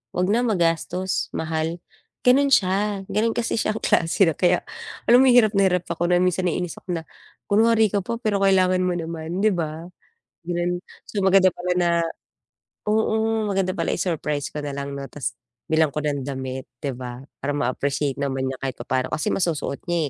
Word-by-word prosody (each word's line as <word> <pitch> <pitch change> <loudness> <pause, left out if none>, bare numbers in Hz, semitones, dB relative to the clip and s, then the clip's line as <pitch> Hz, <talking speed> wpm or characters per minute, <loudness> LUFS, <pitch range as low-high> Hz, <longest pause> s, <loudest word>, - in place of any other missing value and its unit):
'wag 180 0 +1
na 230 +3 +3
magastos 180 -1 0
mahal 160 +1 -2 0.4
gano'n 270 +3 +5
s'ya, 200 -1 +2
gano'n 225 +2 0
kasi 235 - -1
s'yang 215 0 -1
klase 165 +3 +3
na - - +3
kaya 180 +2 +2 0.5
alam 245 - +8
mo - - +5
hirap 240 -4 +6
na 195 -1 +5
hirap 180 -1 +1
ako 175 +1 -1
na 175 - +4
minsan 180 0 +1
naiinis 175 0 -2
ako 175 -2 -3
na, - - -10 0.5
kunwari 220 +1 +5
ka 205 - +1
pa 235 - -3
pero 215 -4 0
kailangan 185 -1 +4
mo 180 -1 0
naman 165 +1 -4
'di 215 - +5
ba, 165 0 -4 0.6
gano'n. 175 0 -1 0.3
So 205 - -2
maganda 190 0 +6
pala 180 0 -2
na 175 -1 +2 1.0
oo, 220 +1 +1
maganda 190 -1 0
pala - - -1
i-surprise 150 -4 -1
ko 150 - -3
nalang 140 -1 -4
'no 140 0 -5
'tas 145 - -4 0.3
bilang 160 -1 +3
ko 150 - -2
ng 145 -2 -1
damit 130 -1 -5 0.2
'di 140 -2 -2
ba, 125 -1 -7 0.2
parang 145 +1 -1
ma-appreciate 140 +2 -1
naman 135 -1 -1
niya 130 - -4
kahit 135 -2 -3
papa'no, 130 +2 -1
kasi 155 - -1
masusuot 165 -6 -1
niya 175 - +2
175 Hz, 180 wpm, -23 LUFS, 150-195 Hz, 1.0 s, alam